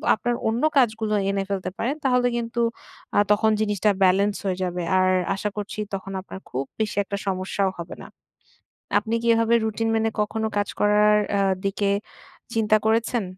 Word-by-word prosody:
আপনার 240 +2 -1
অন্য 230 +4 -1 0.2
কাজগুলো 220 -3 +2 0.2
এনে 195 0 -1
ফেলতে 190 -2 -2
পারেন। 270 +6 -1
তাহলে 250 -1 +3
কিন্তু 235 0 -3 0.6
আ - - +5
তখন 220 +1 +3
জিনিসটা 210 -1 +2
ব্যালেন্স 200 +2 +3
হয়ে 185 -1 -1
যাবে। 180 0 -3 0.2
আর 185 0 +3 0.3
আশা 210 +1 -2
করছি 210 +1 -5 0.2
তখন 195 0 -5
আপনার 190 - -9
খুব 130 +2 -2 0.2
বেশি 215 - -1
একটা 200 - -4
সমস্যাও 190 0 0
হবে 170 - -6
না। - - -9 0.9
আপনি 220 +2 -5
কি - - -1
এভাবে 230 +1 +3
রুটিন 225 +1 -1
মেনে 225 0 +1
কখনো 220 +1 -1
কাজ 205 - +1
করার 210 0 +4 0.2
আ - - +3 0.2
দিকে 200 0 0 0.6
চিন্তা 215 -1 +3
করেছেন? 230 0 +1
210 Hz, 165 wpm, -24 LUFS, 195-225 Hz, 0.9 s, আ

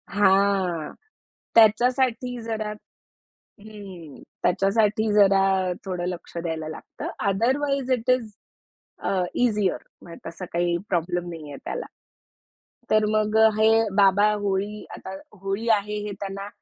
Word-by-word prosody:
हां. 195 -4 +2 0.6
त्याच्यासाठी 245 +2 +3
जरा 220 -1 -3 0.9
हं. 195 -8 -11 0.2
त्याच्यासाठी 210 +3 +2
जरा 195 -2 +4
थोडं 180 -2 -3
लक्ष 175 -1 -7
द्यायला 160 -2 -4
लागतं. 155 - -8 0.2
अदरवाईज 265 +6 0
इट 250 0 0
इस 235 -4 0 0.7
अ, - - -2 0.3
ईझिअर 210 -6 +1 0.2
म्हणजे 170 - -12
तसा 170 +3 -7
काही 175 0 +1
प्रॉब्लेम 175 0 -1
नाहीये 155 -4 -8
त्याला. - - -4 1.0
तर 215 0 +4
मग 215 0 +1 0.2
हे 220 0 +5 0.3
बाबा 200 +1 +5
होळी 205 +1 -2
आता - - -9 0.3
होळी 195 +4 -3
आहे 210 -1 +1
हे 205 - -4
त्यांना 195 0 -5
200 Hz, 110 wpm, -24 LUFS, 185-220 Hz, 1.0 s, हे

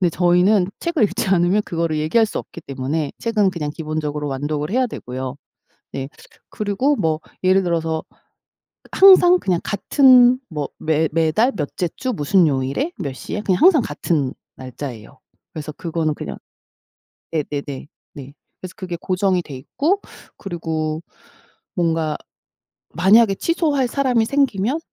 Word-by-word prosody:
근데 180 - +3
저희는 180 +3 +3
책을 335 -6 0
읽지 205 - -1
않으면 185 +2 +3
그거를 165 -2 -1
얘기할 160 +10 +3
수 210 - -4
없기 170 - -9
때문에 140 +3 -3
책은 215 -4 +1
그냥 155 -5 -4
기본적으로 150 -2 -4
완독을 145 +3 -3
해야 255 +2 +2
되고요. 130 - -6 0.6
네 135 0 -4 0.4
그리고 215 +8 0
뭐 160 -6 0 0.2
예를 190 +1 +4
들어서 165 -2 -1 0.9
항상 370 -2 +7
그냥 180 - 0
같은 250 +3 +5
뭐 150 -4 -3
매 160 0 +1
매달 165 +11 +2
몇째 165 +2 -2
주 255 -1 -2
무슨 180 +1 +3
요일에 140 - -1
몇 140 -7 -4
시에 205 - -5
그냥 190 0 0
항상 345 -5 +7
같은 145 - -2 0.2
날짜예요. 130 -3 -8 0.4
그래서 155 -1 -6
그거는 165 -1 -2
그냥 - - -6 0.9
네네네. 145 -3 -4 0.3
네 140 -3 -10 0.3
그래서 185 -1 -8
그게 180 -2 -5
고정이 185 -1 0
돼 150 - -10
있고 315 - -1 0.4
그리고 160 -4 -3 0.8
뭔가 165 -3 0 0.7
만약에 195 +5 +4
취소할 295 - 0
사람이 250 -4 +1
생기면 265 -1 0
175 Hz, 295 characters per minute, -20 LUFS, 150-215 Hz, 0.9 s, 항상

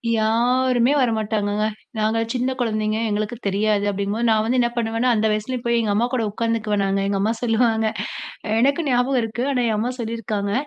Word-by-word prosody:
யாருமே 245 +3 +2
வரமாட்டாங்கங்க. 215 -3 0 0.3
நாங்க 220 +1 +1
சின்ன 255 +1 0
குழந்தைங்க 215 -2 0
எங்களுக்கு 210 +3 -2
தெரியாது, 205 +1 +1
அப்பிடிங்கம்போது, 200 +4 -1
நான் 215 -1 +3
வந்து 245 +3 +1
என்ன 240 -1 +2
பண்ணுவேன்னா, 230 +2 0
அந்த 220 0 +2
வயசுலேயும் 235 +4 -2
போய் 235 0 +2
எங்க 215 -2 0
அம்மா 235 +3 +2
கூட 245 -3 +1
உட்காந்துக்குவேன் 220 -2 -1
நாங்க. 195 0 0
எங்க 200 0 0
அம்மா 215 +3 +1
சொல்லுவாங்க, 225 -1 +2 0.6
அ - - -5
எனக்கு 280 +6 +2
ஞாபகம் 250 +1 +2
இருக்கு. 225 +2 -3
ஆனா 250 -2 +1
எங்க 220 -2 0
அம்மா 240 +3 -1
சொல்லியிருக்காங்க, 220 -3 -3
225 Hz, 175 wpm, -22 LUFS, 215-240 Hz, 0.6 s, நான்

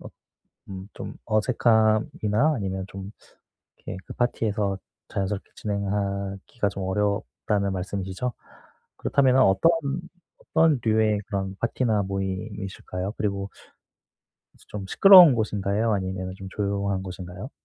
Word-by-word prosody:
어 - - -9 0.6
음 95 0 -8
좀 - - -7
어색함이나 110 +3 +2
아니면 95 -3 -3
좀 95 0 -8 0.7
이렇게 - - -8
그 - - -7
파티에서 105 -5 0 0.3
자연스럽게 100 0 -3
진행하기가 100 +1 -2
좀 100 - -6
어렵다는 100 0 -1
말씀이시죠? 95 +5 -3 0.6
그렇다면은 130 -2 +3
어떤 95 - +5 0.7
어떤 160 -4 +2
류의 110 -1 +2
그런 95 -2 -3
파티나 115 -3 +1
모임이실까요? 95 0 -4
그리고 100 -1 -2 1.0
그래서 - - -22
좀 100 -2 -6
시끄러운 180 - +9
곳인가요? 105 0 0
아니면은 95 -1 -2
좀 95 - -9
조용한 100 -1 -1
곳인가요? 95 +4 -8
100 Hz, 305 characters per minute, -25 LUFS, 95-110 Hz, 1.0 s, 시끄러운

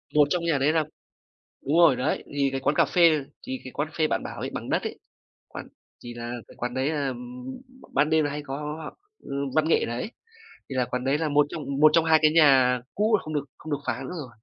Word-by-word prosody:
Một 145 -1 +6
trong 175 +2 0
nhà 165 -4 +2
đấy 145 +3 +2
là 160 -1 +2 0.8
đúng 155 +4 +2
rồi, 170 -7 +6
đấy, 130 +4 -1
thì 140 -1 +2
cái 135 - -2
quán - - 0
cà - - +5
phê 165 -5 +4 0.2
thì 130 0 -4
cái 130 - -7
quán 145 +1 -2
cà 155 - -19
phê 155 - +3
bạn - - -1
bảo - - -7
ấy, - - -3
bằng - - -6
đất - - +1
ấy, - - -5 0.5
quán - - -9 0.4
thì 120 0 -7
là 120 0 -6 0.2
cái - - -15
quán 120 +1 -4
đấy 130 +2 0
là, 145 -3 -1
ừm, 125 0 -7 0.4
b - - -18
ban 150 +2 +3
đêm 160 -1 +3
là 145 - -1
hay 145 +1 -4
có 135 +1 -4
họ 150 +1 -6 0.3
ừm, 140 0 -4
văn 155 0 +3
nghệ - - +3
đấy. 120 +1 -3 0.7
Thì 135 - -6
là 125 - +2
quán 125 +1 -4
đấy 135 +2 +1
là 160 -1 0
một 145 0 +3
trong 155 +1 -6 0.2
một 155 0 +8
trong 165 - +5
hai 160 -1 +5
cái 155 - +6
nhà 135 -6 +5
cũ 215 +2 +2
mà - - -10
không 155 0 -6
được 145 - -1
không 155 - -7
được 145 - 0
phá - - -2
nữa 180 - -6
rồi. 145 -5 -6
145 Hz, 265 wpm, -26 LUFS, 130-155 Hz, 0.8 s, một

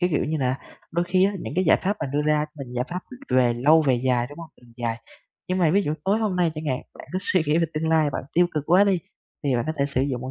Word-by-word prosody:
cái 180 0 +2
kiểu - - +1
như 155 +1 -1
là, 130 0 0 0.3
đôi 170 +1 0
khi 185 +1 +4
á 200 - +2
những - - -5
cái 185 - +2
giải - - +5
pháp 200 +2 0
mà - - -1
đưa 145 +1 +1
ra 150 0 +2
mình 125 -2 -7
giải 125 +1 0
pháp, 180 +1 -4
ừm, 255 - -3
về 120 -2 +3
lâu 155 +6 +5
về 135 -3 +3
dài, 120 -1 +1
đúng 145 - -11
hông? 165 -1 -8
Mình 120 -1 -18
dài. 115 -1 -3 0.5
Nhưng 185 +1 0
mà 165 -4 +4
ví 200 +3 +3
dụ 150 -2 -1
tối 200 +3 +2
hôm 210 -5 -1
nay 170 -3 +2
chẳng 155 0 -6
hạn, 130 0 -1 0.2
bạn - - -11
cứ 185 - 0
suy 185 -4 +2
nghĩ 155 +3 +3
về 165 - +2
tương 160 +1 -1
lai, 155 -2 +3
bạn - - -4
tiêu 175 +1 +4
cực 150 -1 -1
quá 180 +4 +6
đi, 195 -3 +2 0.5
thì 135 -3 +2
bạn 120 - -1
có 155 - -1
thể 140 - +2
sử 140 -2 -1
dụng 130 -3 -2
một 130 0 -5
155 Hz, 315 wpm, -24 LUFS, 130-180 Hz, 0.5 s, quá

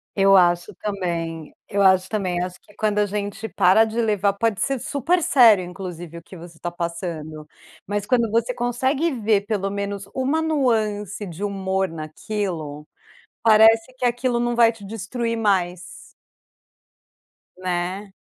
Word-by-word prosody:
Eu 195 -1 +5
acho 175 +2 +2
também 170 -6 -4
eu 200 0 0
acho 190 -1 +4
também, 185 -5 -2
eu 180 - 0
acho 180 0 -9
que 205 - -22
quando 210 -1 0
a 205 - +3
gente 205 +2 -4
para 185 +5 +5
de 225 +1 -3
levar 205 -3 +1
pode 210 0 -1
ser 275 -1 0
super 305 +7 0
sério, 225 -9 +6
inclusive 175 -2 -8
o - - -17
que 180 +2 -13
você 165 -1 -13
tá 175 - -3
passando. 165 -3 -5 0.4
Mas 205 0 -2
quando 235 -1 +2
você 230 +3 0
consegue 260 +7 0
ver 220 -5 +1
pelo 195 -2 -1
menos 200 0 -4
uma 265 +5 0
nuance 220 - 0
de 175 +1 -7
humor 190 -1 -1
naquilo, 155 -2 -5 0.6
parece 225 +2 +5
que 250 - -2
aquilo 245 0 0
não 240 0 0
vai 230 -1 +5
te 225 -3 -13
destruir 230 +3 -3
mais. 185 -5 +1 1.8
Né. 185 +2 -3
200 Hz, 150 wpm, -22 LUFS, 180-225 Hz, 1.8 s, sério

